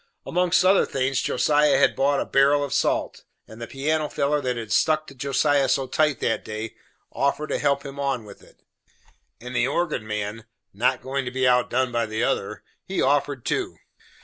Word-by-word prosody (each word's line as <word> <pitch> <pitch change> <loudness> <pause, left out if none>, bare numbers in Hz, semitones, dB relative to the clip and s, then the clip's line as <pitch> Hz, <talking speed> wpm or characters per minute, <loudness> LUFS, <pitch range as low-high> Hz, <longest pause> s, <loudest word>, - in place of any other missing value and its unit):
Amongst 180 +1 +2
other 190 +1 +4
things, 135 0 -1
Josiah 150 +2 +2
had - - +3
bought 140 +1 +2
a - - -2
barrel 140 +1 +3
of 140 - -4
salt, - - -1 0.2
and 110 +1 -12
the 115 - -5
piano 150 +4 -1
feller 145 +1 0
that 125 -2 -2
had 110 -2 -6
stuck 155 -1 +2
to 140 - -12
Josiah 140 +1 +1
so 135 - +1
tight 145 0 +1
that 115 - 0
day, 110 +1 -6 0.4
offered 140 +2 -1
to - - -1
help 140 -1 0
him 140 0 -8
on 135 -5 -2
with 100 - -13
it. - - -22 0.8
And 125 +2 -8
the 125 0 +2
organ 145 -7 -2
man 105 +1 -4 0.3
not 125 +5 0
goin' 135 +1 -2
to - - -2
be 130 0 0
outdone 125 0 +2
by 120 -1 0
the 110 +2 -2
other 105 -5 -2 0.2
he 190 - -4
offered 140 -2 +1
too. - - -2
135 Hz, 190 wpm, -24 LUFS, 120-145 Hz, 0.8 s, other